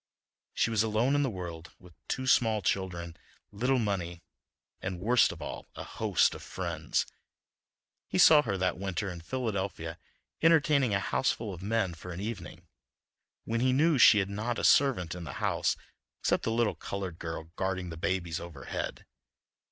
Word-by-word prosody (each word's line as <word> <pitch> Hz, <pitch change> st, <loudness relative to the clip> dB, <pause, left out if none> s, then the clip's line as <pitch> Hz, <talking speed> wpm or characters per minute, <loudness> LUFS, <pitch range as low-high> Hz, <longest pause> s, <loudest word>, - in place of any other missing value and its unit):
She 115 Hz, -, +2 dB
was 110 Hz, -2 st, +3 dB
alone 110 Hz, +5 st, +2 dB
in 145 Hz, -, +3 dB
the 135 Hz, -, +1 dB
world, 85 Hz, -5 st, -7 dB
with 90 Hz, -2 st, -17 dB
two 130 Hz, -, -2 dB
small 110 Hz, -5 st, +3 dB
children, 85 Hz, -3 st, -2 dB, 0.4 s
little 125 Hz, +6 st, +1 dB
money, 90 Hz, -6 st, -2 dB, 0.6 s
and, 90 Hz, -1 st, -4 dB
worst 120 Hz, +6 st, +4 dB
of -, -, -8 dB
all, -, -, -6 dB
a -, -, -6 dB
host -, -, +1 dB
of -, -, -9 dB
friends. -, -, -2 dB, 1.0 s
He -, -, -2 dB
saw 150 Hz, -2 st, +8 dB
her 100 Hz, -8 st, -2 dB
that 90 Hz, -1 st, 0 dB
winter 95 Hz, 0 st, -2 dB
in 85 Hz, -1 st, -8 dB
Philadelphia 100 Hz, -7 st, -3 dB, 0.4 s
entertaining 150 Hz, -8 st, +4 dB
a -, -, +2 dB
houseful 105 Hz, +2 st, -1 dB
of 90 Hz, -, -9 dB
men 105 Hz, -2 st, 0 dB
for 90 Hz, +2 st, -9 dB
an 90 Hz, -, -6 dB
evening, 95 Hz, -5 st, -6 dB, 0.8 s
when 115 Hz, +1 st, -1 dB
he 130 Hz, 0 st, +3 dB
knew 150 Hz, +1 st, +3 dB
she 110 Hz, -, +8 dB
had 100 Hz, -1 st, +1 dB
not 110 Hz, +4 st, -2 dB
a -, -, -3 dB
servant 120 Hz, -12 st, +4 dB
in 90 Hz, -1 st, -7 dB
the 70 Hz, -5 st, -6 dB
house -, -, 0 dB, 0.5 s
except -, -, +1 dB
the -, -, 0 dB
little 115 Hz, -1 st, +2 dB
colored 95 Hz, -4 st, -5 dB
girl 80 Hz, 0 st, -6 dB
guarding 95 Hz, -2 st, -2 dB
the -, -, -6 dB
babies 85 Hz, -1 st, -1 dB
overhead. 85 Hz, -6 st, -6 dB
100 Hz, 165 wpm, -30 LUFS, 85-115 Hz, 1.0 s, saw